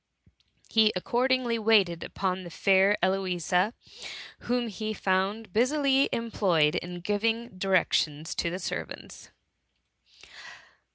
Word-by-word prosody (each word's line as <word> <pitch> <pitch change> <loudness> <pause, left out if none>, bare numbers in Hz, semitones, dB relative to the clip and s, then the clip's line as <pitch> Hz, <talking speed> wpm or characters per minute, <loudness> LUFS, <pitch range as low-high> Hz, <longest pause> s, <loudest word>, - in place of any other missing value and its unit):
He 220 -1 +4
accord 240 +8 0
ingly 245 -3 +1
waited 200 -6 +3
upon 190 -1 -3
the 175 - -9
fair 195 +4 +3
Eloisa, 185 +1 0 0.6
whom 245 0 -1
he 215 0 -5
found 195 +2 -1
busily 275 +3 +2
employed 185 -10 +1
in 175 0 -5
giving 225 +5 -1
directions 165 -5 +1
to 170 - -1
the 180 - -4
servants. 190 - -7
200 Hz, 105 wpm, -27 LUFS, 180-230 Hz, 0.6 s, He